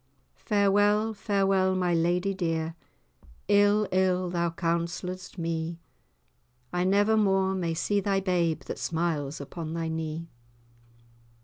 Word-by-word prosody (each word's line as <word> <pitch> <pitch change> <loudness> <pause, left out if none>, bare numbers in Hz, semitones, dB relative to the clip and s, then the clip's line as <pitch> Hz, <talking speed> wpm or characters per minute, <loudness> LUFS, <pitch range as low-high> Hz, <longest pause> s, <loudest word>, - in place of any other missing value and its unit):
Farewell, 205 +1 +3
farewell, 195 -2 +1
my 180 -1 +1
lady 175 +4 +1
dear, 165 -3 -2 0.7
Ill, 205 +1 +4
ill 185 -1 +1
thou 170 -1 0
counsell'dst 170 +3 -3
me: 165 0 -3 0.9
I 180 0 +1
never 205 +3 +3
more 195 -2 +2
may 170 -3 -1
see 205 +5 +1
thy 195 -1 +1
babe 175 -4 0
That - - -7
smiles 160 -3 -2
upon 160 +3 -6
thy 165 -1 -2
knee. 160 0 -4
180 Hz, 115 wpm, -27 LUFS, 165-195 Hz, 0.9 s, Ill